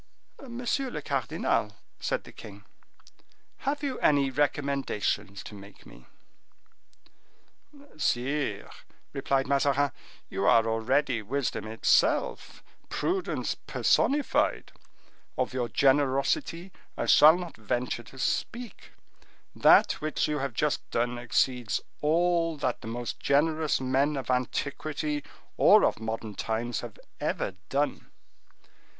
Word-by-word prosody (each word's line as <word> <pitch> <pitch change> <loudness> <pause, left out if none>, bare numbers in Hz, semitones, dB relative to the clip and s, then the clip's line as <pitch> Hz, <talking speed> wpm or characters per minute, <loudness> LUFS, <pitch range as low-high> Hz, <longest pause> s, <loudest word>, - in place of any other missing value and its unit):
"Monsieur 250 +1 -2
le - - -5
cardinal," - - -1 0.2
said - - -2
the - - -13
king, - - -12 0.9
"have 285 +2 -3
you 270 -3 -2
any 140 -2 +3
recommendations 135 -8 -1
to - - -10
make 100 0 -13
me?" - - -16 1.9
"Sire," 135 -5 -1 0.4
replied 135 0 0
Mazarin, 140 0 +2 0.4
"you 100 - -2
are 115 -1 +5
already 115 +2 +1
wisdom 120 -1 -2
itself, 115 - +1 0.3
prudence 375 +1 -1
personified; 290 +1 +1 0.7
of 130 -1 -1
your 125 -2 -1
generosity 140 - +1 0.3
I - - -1
shall 155 +3 +7
not 175 -2 -7
venture 120 +3 -2
to 125 +3 -15
speak; 235 - -3 0.6
that - - +6
which 155 0 0
you 150 -1 -1
have 135 -3 -3
just 150 +3 -1
done 120 +1 -1
exceeds 120 0 0 0.2
all 165 +1 +2
that 130 -4 -2
the - - -8
most 120 +1 -4
generous 155 +1 +2
men 135 +3 +1
of 130 -1 -3
antiquity 145 +3 -2 0.3
or - - +7
of - - 0
modern 110 -1 -4
times 115 +3 -2
have 120 -3 -8 0.2
ever - - -1 0.2
done." 145 +2 -1
135 Hz, 110 wpm, -28 LUFS, 120-155 Hz, 1.9 s, shall